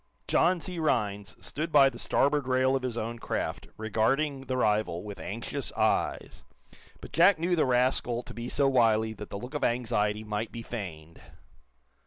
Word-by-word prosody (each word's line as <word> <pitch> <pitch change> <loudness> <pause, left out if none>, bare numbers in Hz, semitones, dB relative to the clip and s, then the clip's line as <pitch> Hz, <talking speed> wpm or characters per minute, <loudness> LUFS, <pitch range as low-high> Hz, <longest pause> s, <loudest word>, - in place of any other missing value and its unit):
John 180 0 +3
C. 180 +1 -5
Rhinds 105 -9 -1
stood 155 +3 -4
by 140 -2 +7
the 135 - -4
starboard 145 -1 +1
rail 130 +1 +3
of 135 - 0
his 125 -2 -3
own 115 +1 -4
craft, - - -3
regarding 135 +6 0
the 130 0 -1
rival 105 -7 +1
with 105 -1 -8
anxious - - -4
eyes. - - 0 0.6
But - - -10
Jack 180 +3 +6
knew 175 +2 +1
the 160 - +2
rascal 125 -1 +1
to - - -10
be 120 +1 -5
so 140 -1 +2
wily 110 -4 +3
that 105 -1 -9
the - - -5
look 125 +7 -8
of 150 - -3
anxiety 110 -3 0
might 105 +1 -3
be 115 - -7
feigned. 85 -9 -7
120 Hz, 175 wpm, -28 LUFS, 110-135 Hz, 0.6 s, by